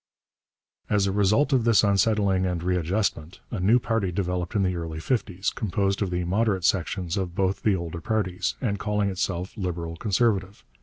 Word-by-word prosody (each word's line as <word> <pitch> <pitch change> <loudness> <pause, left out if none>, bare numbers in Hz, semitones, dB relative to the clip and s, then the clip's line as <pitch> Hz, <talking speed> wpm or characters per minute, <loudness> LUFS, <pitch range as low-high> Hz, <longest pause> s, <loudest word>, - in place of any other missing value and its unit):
As 105 -2 +2
a 100 - 0
result 105 +9 +2
of 125 -3 +3
this 115 -2 +4
unsettling 100 -1 +2
and 90 -2 -2
readjustment, 90 -1 -1
a 110 - -3
new 105 +7 +4
party 115 -6 -1
developed 90 0 -2
in 100 - +3
the 90 -1 0
early 80 -2 -5
fifties, 100 0 -1
composed 100 -2 -1
of 100 - 0
the 90 0 -1
moderate 95 0 +1
sections 90 0 0
of 90 -3 -3
both 95 0 0
the 105 -3 +2
older 85 -1 -5
parties, 95 -3 -1
and 100 -6 -1
calling 105 0 0
itself 90 -1 -3
Liberal 85 -4 -4
Conservative. 100 0 0
95 Hz, 170 wpm, -25 LUFS, 90-105 Hz, -, this